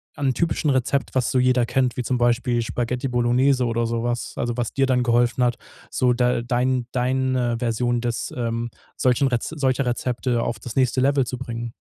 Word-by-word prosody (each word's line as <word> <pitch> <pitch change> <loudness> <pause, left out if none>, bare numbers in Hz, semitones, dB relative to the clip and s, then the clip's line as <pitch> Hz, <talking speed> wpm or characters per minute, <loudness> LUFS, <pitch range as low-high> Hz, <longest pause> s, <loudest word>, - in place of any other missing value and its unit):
an 140 - -1
'nem 130 - +2
typischen 160 -1 0
Rezept, 130 +1 0
was 130 -2 +1
so 130 - +2
jeder 125 -1 +3
kennt, 125 0 0
wie 125 - -1
zum 125 +1 0
Beispiel 120 0 +1
Spaghetti 125 +3 -2
Bolognese 125 +2 +2
oder 115 0 0
so 115 0 -2
was, 120 0 -2
also, 120 -1 -1
was 120 -2 -1
dir 135 -1 +2
dann 125 -1 +2
geholfen 120 0 +2
hat, 120 -1 +1 0.3
so 125 -1 +2
da 125 -1 +1
dein 125 +1 0
deine 130 -1 0
Version 120 0 0
das 120 -1 -3
ähm, 115 0 -2 0.3
solchen 130 +2 +2
Rez 125 -3 -1
solcher 135 -3 0
Rezepte 120 0 -1
auf 115 - -2
das 115 +1 -8
nächste 130 0 +2
Level 135 0 +3
zu 125 - -4
bringen? 120 -2 -5
125 Hz, 195 wpm, -23 LUFS, 120-130 Hz, 0.3 s, jeder